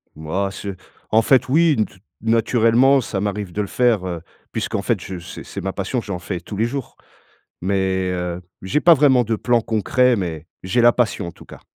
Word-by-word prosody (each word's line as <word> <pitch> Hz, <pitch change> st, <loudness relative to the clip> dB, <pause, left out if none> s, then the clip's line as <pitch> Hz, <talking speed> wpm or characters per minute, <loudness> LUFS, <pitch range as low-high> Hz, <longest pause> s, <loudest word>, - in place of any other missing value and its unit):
Mouais, 90 Hz, +6 st, -2 dB
c'est 100 Hz, 0 st, -6 dB, 0.4 s
en 110 Hz, +1 st, +5 dB
fait, 130 Hz, -1 st, +3 dB
oui, 160 Hz, +2 st, +4 dB
n 110 Hz, -, +2 dB
te -, -, -17 dB, 0.3 s
naturellement, 115 Hz, +4 st, +3 dB
ça 105 Hz, -4 st, -3 dB
m'arrive 100 Hz, -2 st, -3 dB
de 105 Hz, -, -2 dB
le 100 Hz, -, -3 dB
faire, 115 Hz, -6 st, +1 dB
heu, 85 Hz, -2 st, -4 dB, 0.3 s
puisqu'en -, -, -2 dB
fait -, -, 0 dB
je 95 Hz, -, -6 dB
c'est 85 Hz, -, -9 dB
c'est -, -, -7 dB
ma 95 Hz, +1 st, -3 dB
passion, 100 Hz, +6 st, -2 dB
j'en 100 Hz, -5 st, -5 dB
fais 90 Hz, 0 st, -4 dB
tous 95 Hz, +4 st, -8 dB
les 110 Hz, -, +1 dB
jours 130 Hz, +1 st, -5 dB, 0.7 s
mais 95 Hz, -1 st, 0 dB
heu, 90 Hz, 0 st, -3 dB, 0.2 s
j'ai 95 Hz, +11 st, 0 dB
pas 170 Hz, -, +7 dB
vraiment 130 Hz, -4 st, +4 dB
de 110 Hz, +1 st, 0 dB
plan 120 Hz, +1 st, +2 dB
concret 125 Hz, +4 st, +2 dB
mais 85 Hz, -6 st, -4 dB, 0.2 s
j'ai 105 Hz, +6 st, +1 dB
la 120 Hz, 0 st, +7 dB
passion 120 Hz, -7 st, 0 dB
en 85 Hz, -, -8 dB
tout -, -, -16 dB
cas. -, -, -12 dB
105 Hz, 210 wpm, -21 LUFS, 95-120 Hz, 0.7 s, pas